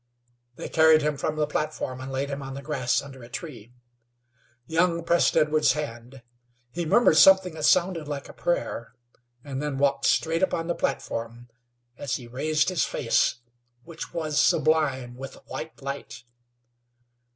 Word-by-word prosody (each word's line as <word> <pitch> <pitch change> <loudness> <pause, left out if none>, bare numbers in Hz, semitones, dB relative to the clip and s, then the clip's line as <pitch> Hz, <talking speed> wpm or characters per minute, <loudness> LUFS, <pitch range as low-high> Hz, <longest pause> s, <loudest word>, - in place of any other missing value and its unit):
They - - -6
carried 160 -1 +5
him 150 0 0
from 150 +2 -2
the 155 -1 +1
platform, 150 -4 -3
and 130 +1 -6
laid 135 +1 -2
him 140 0 -4
on 135 0 -7
the 140 - -7
grass 135 -4 0
under 135 -2 -11
a 120 - -12
tree. 120 -6 -8 0.9
Young 170 +2 +1
pressed 170 0 +2
Edwards' 150 -2 +3
hand; 125 -3 -7 0.5
he 170 +2 -3
murmured 165 -3 +4
something 190 -2 +6
that 155 -1 -3
sounded 170 -3 +2
like 145 -2 -5
a - - -11
prayer, 145 -8 -3 0.5
and 135 -1 -5
then 150 -2 -3
walked 140 0 +1
straight 165 +1 +2
upon 170 -3 0
the 170 - -1
platform, 115 -5 -4 0.5
as 140 -1 -2
he 125 - -7
raised 150 +7 0
his 185 -4 +1
face, 120 0 +1 0.4
which 170 -1 -8
was 155 -3 0
sublime 135 -6 +1
with 135 +1 -8
a - - -15
white 160 - -8
light. 135 -3 -6
150 Hz, 160 wpm, -26 LUFS, 130-160 Hz, 0.9 s, something